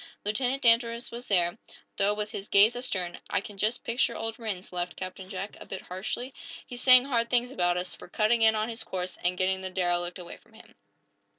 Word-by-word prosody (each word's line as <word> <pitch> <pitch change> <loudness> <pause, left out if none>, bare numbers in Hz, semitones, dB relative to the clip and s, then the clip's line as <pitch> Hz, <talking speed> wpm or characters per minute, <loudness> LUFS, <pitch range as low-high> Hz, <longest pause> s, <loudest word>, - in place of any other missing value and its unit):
Lieutenant 250 +6 0
Danvers 235 0 +3
was 240 +1 -7
there, 175 0 +2 0.4
though 200 +1 +2
with 210 0 -3
his 195 - -6
gaze 210 +4 +6
astern. 185 -8 -3
"I - - +2
can 200 +1 -9
just 220 +4 0
picture 235 +2 +1
old 225 0 -4
Rhinds," 200 -6 -5
laughed 175 0 -3
Captain 185 0 -7
Jack, 195 +1 -5
a - - -10
bit 190 - -6
harshly. 220 +8 -4 0.3
"He's 245 -1 -8
saying 255 0 +8
hard 235 -4 +1
things 245 0 +2
about 175 -6 +1
us, 180 0 -3
for - - -10
cutting 225 +2 +2
in 220 0 +6
on 215 0 0
his 230 -1 -5
course 180 -3 -5
and 180 +1 +1
getting 190 0 +1
the 190 - -4
derelict 175 -1 0
away 175 -2 -9
from - - -26
him." 220 - -16
210 Hz, 210 wpm, -28 LUFS, 185-235 Hz, 0.4 s, saying